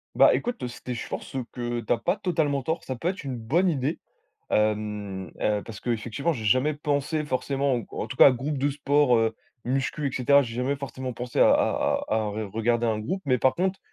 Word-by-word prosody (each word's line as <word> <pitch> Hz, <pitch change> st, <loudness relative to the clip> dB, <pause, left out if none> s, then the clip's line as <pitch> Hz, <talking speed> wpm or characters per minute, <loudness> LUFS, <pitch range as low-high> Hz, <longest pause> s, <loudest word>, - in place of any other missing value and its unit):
Bah -, -, +7 dB
écoute 245 Hz, -, -3 dB
c'était 125 Hz, +1 st, -6 dB
je 120 Hz, -, -5 dB
pense, -, -, -6 dB
heu, 130 Hz, -, -2 dB
que 120 Hz, -1 st, -3 dB
tu 115 Hz, -, -5 dB
as 120 Hz, -, +4 dB
pas 175 Hz, +11 st, 0 dB
totalement 155 Hz, -8 st, 0 dB
tort 160 Hz, +5 st, -2 dB
ça 130 Hz, -, -4 dB
peut 160 Hz, -, -3 dB
être 185 Hz, -2 st, -2 dB
une 130 Hz, -2 st, -4 dB
bonne 145 Hz, +12 st, +1 dB
idée, 150 Hz, -2 st, 0 dB, 0.5 s
hem, 105 Hz, -3 st, -1 dB
heu, 105 Hz, -1 st, +1 dB
parce 110 Hz, -3 st, -8 dB
qu'effectivement 120 Hz, +7 st, -1 dB
j'ai 110 Hz, -5 st, -5 dB
jamais 130 Hz, +7 st, +3 dB
pensé 150 Hz, +1 st, -1 dB
forcément 135 Hz, 0 st, 0 dB
ou 120 Hz, -, -3 dB
qu -, -, -13 dB
ou -, -, -3 dB
en -, -, -4 dB
tout 125 Hz, -, -6 dB
cas -, -, +9 dB
groupe 135 Hz, +3 st, -3 dB
de 145 Hz, +2 st, +2 dB
sport, 145 Hz, -2 st, +3 dB
heu, 115 Hz, 0 st, +1 dB, 0.3 s
muscu 135 Hz, +3 st, -1 dB
et -, -, -3 dB
cetera 140 Hz, +3 st, +4 dB
j'ai 115 Hz, -3 st, -6 dB
jamais 125 Hz, +3 st, 0 dB
forcément 130 Hz, -2 st, -5 dB
pensé 125 Hz, +1 st, -4 dB
à -, -, +7 dB
à -, -, +2 dB
à -, -, 0 dB
à 110 Hz, -, +1 dB
re 105 Hz, 0 st, -3 dB
regarder 115 Hz, +2 st, +1 dB
un 110 Hz, -2 st, 0 dB
groupe 185 Hz, -, -3 dB
mais 130 Hz, -3 st, +2 dB
par 130 Hz, -, +3 dB
contre 190 Hz, +2 st, 0 dB
130 Hz, 235 wpm, -26 LUFS, 115-145 Hz, 0.5 s, cas